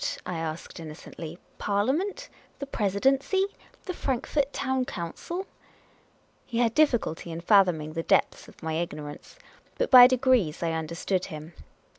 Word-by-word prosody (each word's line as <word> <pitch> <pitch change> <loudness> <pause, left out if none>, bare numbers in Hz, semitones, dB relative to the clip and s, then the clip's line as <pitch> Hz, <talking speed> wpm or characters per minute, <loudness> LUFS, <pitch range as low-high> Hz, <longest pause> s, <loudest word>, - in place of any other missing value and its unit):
I 175 -2 -3
asked, 160 +1 -5
innocently. 160 +1 -8 0.2
"Parliament? 290 - 0 0.3
The 280 - -5
Presidency? 270 - +1 0.4
The 365 - -3
Frankfort 275 -1 -1
Town 265 -2 -1
Council? 275 - -5 0.5
" - - -36 0.2
He 235 - -4
had 235 -2 +2
difficulty 240 - +1
in 165 - -5
fathoming 175 -5 +3
the 165 - -2
depths - - +1
of - - -17
my 160 0 -2
ignorance. 155 - -5 0.4
But - - -1
by 250 -1 +11
degrees 250 -11 +2
I 165 - +1
understood 170 +3 -2
him. 155 -1 -9
200 Hz, 135 wpm, -27 LUFS, 165-265 Hz, 0.5 s, by